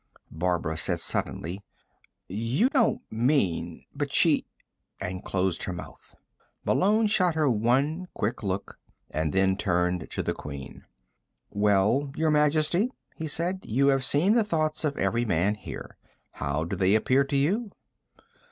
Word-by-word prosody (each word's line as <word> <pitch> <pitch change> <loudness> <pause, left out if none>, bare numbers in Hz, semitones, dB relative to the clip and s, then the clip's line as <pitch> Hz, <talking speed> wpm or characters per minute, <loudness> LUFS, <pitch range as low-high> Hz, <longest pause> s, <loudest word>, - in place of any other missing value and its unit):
Barbara 80 -1 -1
said - - +1
suddenly: 90 +5 -3 0.6
"You 115 - +1
don't 260 -5 +2
mean... 110 - 0
but - - -3
she - - +3 0.3
" - - -46
and 90 +1 -5
closed 95 -2 -1
her 90 - -3
mouth. 90 - -11 0.5
Malone 215 +4 +3
shot 185 -5 +3
her 155 -2 +2
one 135 - +1
quick 110 +4 -2
look, 100 -1 -4 0.3
and 80 0 -1
then 95 0 +2
turned 90 -3 0
to - - -3
the - - -1
Queen. 70 -2 -9 0.7
"Well, 105 +7 +2
Your 160 0 +1
Majesty?" 155 - +3 0.3
he 160 - -4
said. 175 +5 -1
"You 140 +5 +2
have 135 -1 +2
seen 160 +10 +3
the 235 -1 +4
thoughts 155 -6 -1
of 145 -2 -1
every 120 +1 +1
man 100 -2 +1
here. 105 - -9 0.3
How 70 +2 -2
do 85 +4 -3
they 95 +2 +3
appear 130 +5 +3
to 140 +1 -3
you?" 200 +11 +1
120 Hz, 145 wpm, -27 LUFS, 95-155 Hz, 0.7 s, the